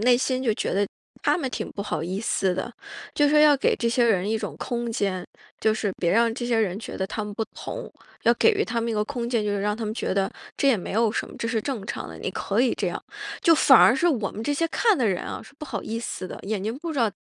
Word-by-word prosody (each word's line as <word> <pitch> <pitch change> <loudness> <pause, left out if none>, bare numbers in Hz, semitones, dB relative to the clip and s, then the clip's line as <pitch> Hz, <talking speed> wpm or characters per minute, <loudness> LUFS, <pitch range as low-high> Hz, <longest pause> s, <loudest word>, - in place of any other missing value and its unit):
内 245 +2 +5
心 255 +1 0
就 230 -4 +2
觉 - - -2
得 200 0 +2 0.4
他 - - +3
们 270 -6 -2
挺 - - -4
不 200 - -6
好 200 - -2
意 185 +4 -3
思 190 -4 +1
的， 190 +6 -3 0.4
就 295 - +4
说 300 - +5
要 300 -1 +7
给 - - +2
这 235 - 0
些 240 +1 +3
人 200 -3 +2
一 220 - +1
种 205 -9 -4
空 235 -1 -3
间， 190 -4 -1 0.3
就 220 - +3
是 215 -2 -1
别 170 - +1
让 230 +3 +4
这 240 - -4
些 235 -2 +2
人 200 -3 0
觉 - - -7
得 190 - 0
他 215 - -4
们 210 - -6
不 225 - -1
同， - - -6 0.3
要 235 - +6
给 455 - +5
予 415 +1 +1
他 235 -1 -2
们 230 0 -1
一 - - -1
个 210 - +1
空 240 -2 -4
间。 230 -3 +1
就 210 - 0
是 205 -1 -1
让 210 0 +1
他 225 - -4
们 215 - -3
觉 220 - -2
得 195 -1 +1 0.3
这 275 - +3
也 250 - +5
没 180 - -6
有 225 0 +3
什 - - -2
么， - - -12
这 230 - -2
是 225 -2 0
正 250 -8 -3
常 - - -4
的， - - -9
你 - - -3
可 205 +4 -1
以 255 - +3
这 - - -1
样， - - -5 0.4
就 330 - +6
反 270 -4 +7
而 235 - +7
是 345 +7 +1
我 225 - 0
们 215 - -6
这 290 - 0
些 330 +3 +1
看 435 0 +3
的 235 - +2
人 185 -3 0
啊， - - -5
是 - - -16
不 305 - -6
好 - - -4
意 225 +1 -3
思 185 -5 -5
的， - - -8
眼 200 -1 -2
睛 225 +4 -2
不 330 0 -4
知 285 - -3
道， 225 -3 +3
230 Hz, 320 characters per minute, -25 LUFS, 205-255 Hz, 0.4 s, 要